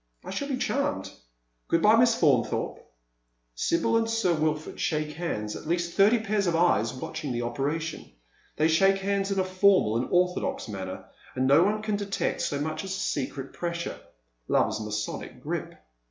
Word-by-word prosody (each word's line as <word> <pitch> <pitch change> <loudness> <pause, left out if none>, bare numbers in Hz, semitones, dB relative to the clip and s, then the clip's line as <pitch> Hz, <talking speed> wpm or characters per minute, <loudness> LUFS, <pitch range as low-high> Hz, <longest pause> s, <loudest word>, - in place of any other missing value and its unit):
" - - -27
I - - -6
shall 280 +9 -3
be 270 -3 -1
charmed. 280 +3 -1 0.6
Good 165 - +1
bye 215 +1 +7
Miss 230 0 +5
Faunthorpe." 135 -8 +1 0.7
Sibyl 170 - +1
and 225 0 0
Sir 225 -6 +2
Wilford 155 -1 -2
shake 150 -1 -1
hands, 105 -11 -3
at - - -8
least 170 +1 -1
thirty 205 +4 +5
pairs 210 -3 0
of 170 - +1
eyes 165 -10 +3
watching 140 +3 -5
the 120 0 -2
operation. 145 +7 -3 0.4
They 155 - +3
shake 195 +4 +4
hands 195 0 -1
in 195 - -1
a 190 - +3
formal 185 - +3
and 120 - -1
orthodox 180 -5 0
manner, 95 -3 -6 0.3
and 130 - +1
no 140 +5 +6
one 210 +2 0
can 215 -1 0
detect 200 -1 -2
so 140 - -1
much 155 +1 -3
as 190 0 -4
a - - -5
secret 135 -3 -3
pressure 170 0 -4 0.3
— - - -46
love's - - +2
Masonic 105 0 -4
grip. - - -4
170 Hz, 180 wpm, -27 LUFS, 140-200 Hz, 0.7 s, bye